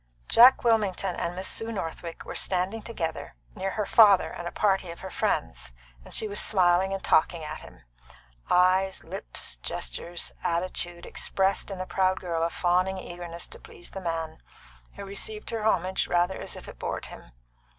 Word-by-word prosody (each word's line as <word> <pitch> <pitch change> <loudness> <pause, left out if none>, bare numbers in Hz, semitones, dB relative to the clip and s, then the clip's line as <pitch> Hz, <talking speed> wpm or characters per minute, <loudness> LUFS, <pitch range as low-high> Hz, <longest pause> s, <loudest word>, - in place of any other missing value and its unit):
Jack 245 +3 +7
Wilmington 200 -5 +2
and 170 - -3
Miss 185 +1 -2
Sue 225 +1 -1
Northwick 165 -4 -5
were - - -6
standing 190 +4 0
together 165 -9 -4 0.2
near 195 -1 -2
her 210 - +1
father 205 -4 +6
and 175 - -6
a - - -4
party 195 -4 +1
of 170 - -8
her 190 - -7
friends, - - -2 0.3
and - - -9
she 220 - +2
was 205 0 0
smiling 185 -1 +3
and 195 0 -3
talking 160 +1 +3
at 150 - -5
him. - - -14 0.7
Eyes, 185 +1 +3
lips, - - -6
gestures, 65 - -4
attitude 175 0 -1
expressed 195 +1 0
in 195 - -5
the 185 - -4
proud 185 0 +1
girl 170 -2 -2
a 165 - +2
fawning 185 +2 +1
eagerness 175 -2 -6
to - - -11
please 175 - -11
the 195 - -6
man, 165 -2 -3 0.6
who - - -7
received 210 +3 -4
her 225 -2 -2
homage 185 -2 +1
rather 175 +2 +1
as - - -4
if - - -10
it - - -11
bored - - -3
him. - - -11
185 Hz, 175 wpm, -27 LUFS, 170-195 Hz, 0.7 s, Jack